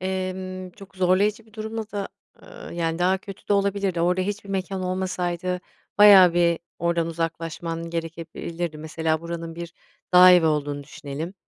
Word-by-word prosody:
emm, 185 0 -4
çok 195 0 -15
zorlayıcı 200 +5 +2
bir 220 - -23
durumla 220 0 -5
da, 200 -2 -4 0.3
ııı, - - -11
yani, 165 -1 -1
daha 185 +2 +2
kötü 195 +1 -12
de - - +3
olabilirdi, 200 -3 +1
orada 180 +2 +2
hiçbir 200 +1 -4
mekân 190 0 -2
olmasaydı 180 -1 -2 0.4
bayağı 190 -4 +9
bir 170 -1 +3 0.2
oradan 170 -1 0
uzaklaşman 165 0 -4
gerekebilirdi. 165 0 -5
Mesela, 160 0 -1
buranın 170 -1 -6
bir 170 0 -7 0.4
dağ 180 0 +9
evi 175 -3 +5
olduğunu 145 -2 -1
düşünelim. 150 +4 -7
180 Hz, 145 wpm, -24 LUFS, 165-190 Hz, 0.4 s, bayağı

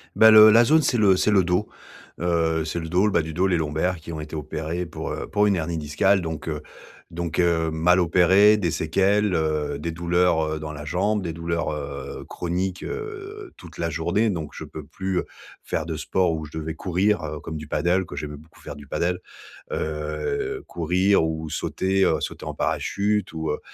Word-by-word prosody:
Bah, 110 0 +8
le 110 0 +10
la 115 +2 +7
zone, 155 +6 +4
c'est 125 - +1
le 100 -4 +5
c'est 105 +3 +2
le 95 -2 +4
dos, 90 +4 0 0.5
heu, 80 -2 +1
c'est 80 +2 -3
le 80 -1 -6
dos, 90 +5 +3
le 105 - +2
bas - - +3
du 80 0 -6
dos, 90 +4 +2
les 90 -2 +2
lombaires, 80 +4 -1
qui 80 +1 -9
ont 80 - -5
été 75 +1 -7
opérées 80 +3 -4
pour, 85 - -6
heu, - - -4
pour 105 0 +2
une 100 - +3
hernie 80 0 -2
discale, 80 +6 +2
donc 80 -2 -5
heu 75 -2 -3 0.5
donc 85 -1 -4
heu, 85 -2 +2
mal 90 +3 +3
opérées, 95 +5 +5
des 90 -5 0
séquelles, 100 +6 +1
heu, 75 -3 -1
des 85 +3 -3
douleurs, 85 -1 +2
heu, - - -5
dans 75 0 -6
la 75 - -7
jambe, 95 +7 0
des 85 -3 -3
douleurs, 85 0 -2
heu, 70 -2 -6
chroniques, 90 +2 -3
heu, 420 -2 -7
toute - - -13
la 85 - -1
journée, 85 +8 0
donc 80 -7 -4
je - - -7
peux - - -9
plus, 95 -1 -3
heu, - - -3 0.4
faire - - -2
de - - -4
sport 90 -3 0
où 80 -1 -4
je 75 - -10
devais 80 0 -4
courir, 90 +2 0
heu, 75 -1 -5
comme 80 +2 -7
du 75 - -6
paddle, 90 +3 +1
que 70 - -9
j'aimais 75 0 -5
beaucoup 80 +3 -17
faire 75 - -8
du 70 -1 -12
paddle, 90 +4 -1 0.5
heu, 75 -1 -3
courir 90 +3 +2
ou 80 -1 -3
sauter, 95 +5 0
heu, - - +3
sauter - - -5
en - - -4
parachute 105 +1 -1
ou, 80 -2 -3
heu, 75 - -3
85 Hz, 210 wpm, -24 LUFS, 80-95 Hz, 0.5 s, le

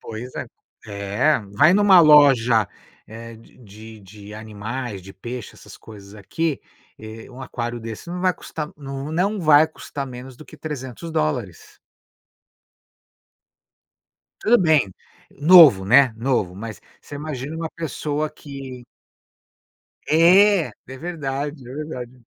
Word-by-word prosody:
Pois 115 +3 -8
é. - - -5 0.4
É, 100 +8 0 0.2
vai 155 - +5
numa 200 -3 +6
loja, 135 - +5 0.4
eh, 115 +1 -10
de 115 - -20
de 110 -1 -13
de 100 +1 -13
animais, 110 0 -6
de 95 +2 -12
peixe, 120 +4 -8
essas - - -14
coisas 100 -2 -14
aqui, 135 +9 -3 0.4
eh, 110 +2 -11
um 125 +1 -12
aquário 120 -1 -5
desse 115 +6 -9
não 180 +1 -5
vai 185 -1 +3
custar 155 -3 -7
n 140 +1 -6
não 195 +6 0
vai 155 -3 +5
custar 145 -3 -7
menos 125 0 -10
do 155 - -13
que 155 - -15
$300. 145 - -5 2.6
Tudo 235 +3 +5
bem, 155 - +2 0.4
novo, 150 - +7
né, 125 +3 +5
novo. 115 -7 -1
Mas 110 +1 -8 0.2
você - - -12
imagina 145 -1 -6
uma 160 0 -4
pessoa 155 -2 -4
que 135 -3 -10 1.2
É! 180 +3 +5 0.2
É 130 0 -9
verdade, 145 -4 -5
é - - -9
verdade. 130 -5 -7
130 Hz, 125 wpm, -21 LUFS, 110-155 Hz, 2.6 s, novo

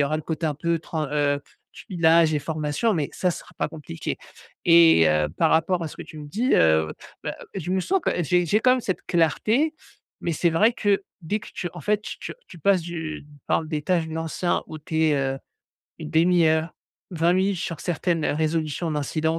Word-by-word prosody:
y - - +3
aura 155 +2 0
le - - -6
côté 160 +1 -4
un 155 - +1
peu 170 +3 0
tran 155 -1 -3
heu, 145 -1 +1 0.3
tuilage 165 -3 +3
et - - +2
formation 155 +8 -1
mais 155 -6 -1
ça 180 - 0
sera - - -8
pas - - -1
compliqué. 150 - -6 0.5
Et 165 - +7
heu, 75 0 +2
par - - +3
rapport 165 +2 +2
à 160 - -3
ce - - -12
que - - -7
tu 155 - -11
me 150 - -8
dis, 235 - -1
heu, 80 -1 +3 0.3
bah, - - -4 0.2
je 180 -2 -4
me 190 0 +1
sens 385 - +1
quand - - +1
j'ai 175 +3 +2
j'ai 210 +7 +2
quand 255 +1 +5
même 255 - +1
cette 190 - -2
clarté, 215 - +2 0.5
mais 170 -2 -2
c'est 170 +3 +2
vrai 215 +9 +3
que 200 -3 +1 0.2
dès 205 +7 -1
que - - -11
tu 175 -3 -4
en 175 - -9
fait, 210 +5 0
tu - - -7
tu - - -6
tu 175 - -12
passes 190 +1 +3
du 160 -3 -5 0.2
par 160 - +1
des 155 -1 -3
tâches 165 0 0
de - - -7
l'anciens 165 +2 -1
où 155 - -8
tu 160 +1 -1
es, 155 -2 +3
heu, 135 0 -1 0.6
une 155 -2 -6
1/2 170 +1 +4
heure, 160 +1 +2 0.4
20 170 0 +2
minutes 190 -1 +1
sur 165 -3 -4
certaines, 170 -2 -1
heu, - - +1
résolutions 160 +1 -1
d'incidents, 155 +2 -1
165 Hz, 220 wpm, -24 LUFS, 155-180 Hz, 0.6 s, Et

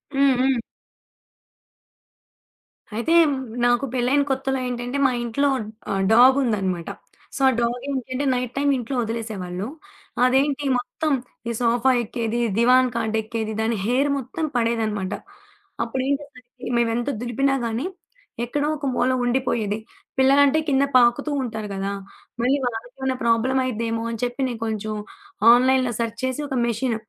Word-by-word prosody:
హ్మ్. 275 -1 +4
హ్మ్. 260 -1 +2 2.3
అయితే 235 +9 0 0.5
నాకు 245 +2 +3
పెళ్లైన 255 +3 +2
కొత్తలో 265 0 -1
ఏంటంటే, 245 +2 -3
మా 255 - 0
ఇంట్లో 240 +5 0 0.4
ఆహ్, 195 -1 0
డాగ్ 255 +4 +7
ఉందనమాట. 190 -7 -1 0.5
సో, - - -4
ఆ - - +3
డాగ్ 240 +1 -1
ఏంటి 265 -3 -3
అంటే, 275 +3 -1
నైట్ 250 -1 -3
టైమ్ 285 0 +2
ఇంట్లో 250 +2 -4
వదిలేసేవాళ్లు. 215 -4 -4 0.6
అదేంటి? 275 +3 +2
మొత్తం 285 +5 -2 0.4
ఈ - - 0
సోఫా 240 +2 +3
ఎక్కేది, 230 +1 -2 0.2
దివాన్ 250 +2 +5
కాట్ 225 -1 -1
ఎక్కేది. 220 0 -4
దాని 225 0 0
హెయిర్ 260 +5 +2
మొత్తం 275 +5 -3
పడేదనమాట. 220 -4 0 0.7
అప్పుడు 235 +3 -3
ఏం 280 - +3
చేసా 285 -2 -14
అంటే 250 +1 -10
మేమెంత 235 +2 0
దులిపినా 270 +3 +1
గానీ, 230 +5 -2 0.6
ఎక్కడో 290 +4 -1
ఒక 290 -1 -6
మూల 245 - +2
ఉండిపోయేది. 240 -4 0 0.4
పిల్లలంటే 280 +3 +5
కింద 270 0 +3
పాకుతూ 250 +5 +3
ఉంటారు 220 -3 -4
కదా! 195 +1 -2 0.5
మళ్లీ 260 +4 +3
వాళ్లకేమైనా 245 +3 -3
ప్రాబ్లమ్ 235 +3 +2
అయిద్దేమో 230 -2 -2
అని 230 - -5
చెప్పి, 245 +2 -2
నేను 235 -2 -6
కొంచెం 215 -1 -3 0.6
ఆన్‌లైన్‌లో 255 0 +3
సెర్చ్ 230 0 -2
చేసి 260 +3 -2
ఒక 265 - -1
మెషిన్ 235 +1 -1
245 Hz, 135 wpm, -23 LUFS, 230-265 Hz, 2.3 s, డాగ్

